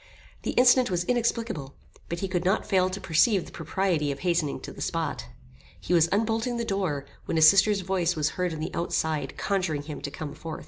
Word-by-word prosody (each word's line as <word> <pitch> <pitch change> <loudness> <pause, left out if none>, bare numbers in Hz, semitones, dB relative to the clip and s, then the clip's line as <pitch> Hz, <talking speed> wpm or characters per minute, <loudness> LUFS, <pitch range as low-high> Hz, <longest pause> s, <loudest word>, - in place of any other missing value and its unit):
The - - -3
incident 250 0 +5
was 175 -2 0
inexplicable; 225 - -1 0.3
but 170 0 -4
he 195 - -1
could 180 -2 -1
not 190 +4 +1
fail 185 -2 +2
to 190 +1 -5
perceive 190 +3 +2
the - - -13
propriety 165 -2 -1
of 140 - -7
hastening 170 -5 0
to - - -8
the - - -11
spot. - - -2 0.5
He 175 - -2
was 165 -1 +5
unbolting 225 +4 0
the 235 - -2
door, 185 -10 -2 0.2
when - - -1
his 160 0 +8
sister's 200 +3 +5
voice 180 -2 0
was 155 -1 +1
heard 180 +1 -2
on 155 -1 -5
the 160 - -4
outside 160 -4 -2
conjuring 185 -7 -1
him 150 0 -7
to - - -4
come 145 +1 -7
forth. 160 -1 -7
180 Hz, 210 wpm, -26 LUFS, 155-200 Hz, 0.5 s, his